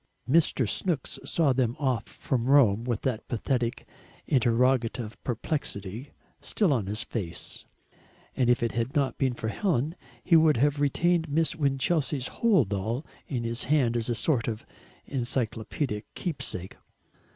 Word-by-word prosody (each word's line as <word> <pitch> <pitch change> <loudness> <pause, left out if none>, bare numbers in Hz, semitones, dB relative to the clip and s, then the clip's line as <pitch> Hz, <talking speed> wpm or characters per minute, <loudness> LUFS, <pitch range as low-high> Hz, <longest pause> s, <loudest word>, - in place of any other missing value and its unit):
Mr. 140 -4 +3
Snooks 160 - -1
saw 155 -6 +2
them 125 -2 +1
off 130 -6 0
from 120 -3 -2
Rome 120 -5 +5
with 120 -4 -1
that 125 -4 -2
pathetic 120 0 -1 0.4
interrogative 120 -2 +2
perplexity 120 - -3 0.3
still 195 -9 +1
on 110 -7 -1
his 105 +2 0
face, 90 -7 -5 0.7
and 125 -2 +2
if 120 -1 +3
it 115 - +1
had 115 +2 -2
not 140 -2 +1
been 130 -3 +1
for 110 - -3
Helen 155 - 0 0.3
he 170 - +4
would 155 -4 +5
have 145 +3 +2
retained 165 +3 +2
Miss 160 +3 +1
Winchelsea's 140 -1 0
hold 190 - +2
all 110 +8 -2 0.2
in 125 -4 -2
his 115 +1 -2
hand 130 -5 +2
as 115 0 -1
a 120 - +1
sort 125 -2 +1
of 110 -2 -4 0.4
encyclopaedic 120 -2 -2
keepsake. 95 - -4
125 Hz, 140 wpm, -28 LUFS, 115-145 Hz, 0.7 s, Rome